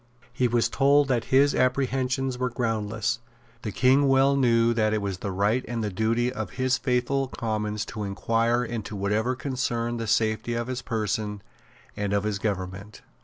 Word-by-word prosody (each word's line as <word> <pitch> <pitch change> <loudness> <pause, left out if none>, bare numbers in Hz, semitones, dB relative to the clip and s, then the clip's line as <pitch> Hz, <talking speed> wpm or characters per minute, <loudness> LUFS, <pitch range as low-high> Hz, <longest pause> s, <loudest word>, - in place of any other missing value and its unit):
He 125 0 +2
was 120 -1 +2
told 140 0 +3
that 120 -3 +1
his 140 +2 +4
apprehensions 130 0 0
were 130 0 0
groundless. 115 -1 -1 0.4
The 110 - -4
King 135 +5 +4
well 135 +1 +4
knew 120 -3 +3
that 110 -2 +1
it - - +1
was 100 -2 -3
the 100 - -4
right 105 +6 +1
and 115 -2 -3
the 105 - -2
duty 115 +5 0
of - - -5
his 130 0 +1
faithful 130 +1 0
Commons 110 -4 -3
to 110 - -7
inquire 115 +4 +1
into 115 -2 -5
whatever 105 +5 0
concerned 120 -3 -2
the 115 - -3
safety 110 +2 +1
of 120 0 -1
his 130 +1 -4
person 105 -3 -2 0.5
and 100 -1 -2
of 100 0 +1
his 105 -1 -2
government. 100 0 -4
115 Hz, 170 wpm, -26 LUFS, 105-130 Hz, 0.5 s, his